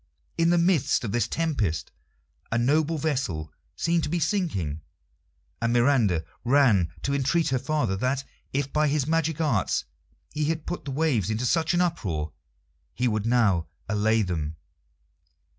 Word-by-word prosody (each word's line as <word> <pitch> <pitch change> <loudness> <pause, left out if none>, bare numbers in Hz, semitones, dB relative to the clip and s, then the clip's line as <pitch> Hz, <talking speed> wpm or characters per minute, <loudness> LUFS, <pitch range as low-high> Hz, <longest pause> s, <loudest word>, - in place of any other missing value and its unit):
In 165 0 +3
the 175 - +4
midst 170 -7 +2
of 105 - -3
the 120 +2 +1
tempest 115 - -1 0.6
a 115 - +1
noble 155 +6 +2
vessel 125 - -2 0.2
seemed 170 0 +1
to - - -2
be 175 +2 0
sinking, 145 - -1 0.8
and 115 0 +1
Miranda 120 - +3 0.2
ran 120 - +4
to 140 - 0
entreat 140 +5 +1
her 130 -1 +1
father 130 -7 0
that, 130 +5 0 0.3
if 140 0 -2
by 150 0 +3
his 145 -2 +1
magic 160 0 0
arts 140 - +1 0.5
he 150 0 0
had 160 0 -2
put 175 - -5
the - - -5
waves 135 - +1
into 110 +3 -1
such 160 +5 +2
an 175 - +3
uproar, 95 - -2 0.6
he 125 - +1
would 110 -1 0
now 110 -9 +3 0.2
allay 110 +1 +2
them. 80 -5 -3
130 Hz, 155 wpm, -26 LUFS, 105-160 Hz, 0.8 s, the